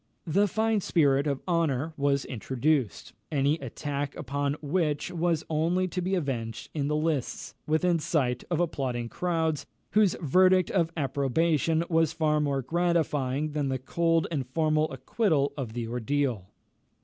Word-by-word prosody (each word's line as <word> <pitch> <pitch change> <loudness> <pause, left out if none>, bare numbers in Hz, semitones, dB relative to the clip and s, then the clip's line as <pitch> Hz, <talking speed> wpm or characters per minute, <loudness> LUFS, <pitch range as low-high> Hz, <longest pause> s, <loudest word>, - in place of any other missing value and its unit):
The 195 +6 +3
fine 220 +1 +1
spirit 145 -5 +2
of 140 -2 -2
honour 160 -3 0
was 140 -2 +1
introduced, 130 +1 -1 0.2
any 145 +2 +2
attack 140 +1 -4
upon 140 +2 -2
which 150 -1 -1
was 170 -2 0
only 170 +4 +1
to 180 - -3
be 185 +2 0
avenged 120 - -3
in 145 -3 -1
the 150 - 0
lists, 155 -4 -2
within 165 +2 +2
sight 130 -6 0
of 170 -2 0
applauding 130 -8 -1
crowds, 160 -4 -1 0.2
whose 210 -3 +4
verdict 185 +3 +4
of 170 -4 +2
approbation 155 +3 +1
was 165 -2 +2
far 155 -2 +1
more 140 -2 0
gratifying 155 -3 0
than 145 -2 -1
the 130 - 0
cold 165 +5 +1
and 135 -6 -2
formal 155 +1 +1
acquittal 140 - 0
of 125 -6 -5
the 120 -1 -3
ordeal. 125 -3 -1
150 Hz, 145 wpm, -28 LUFS, 135-165 Hz, 0.2 s, whose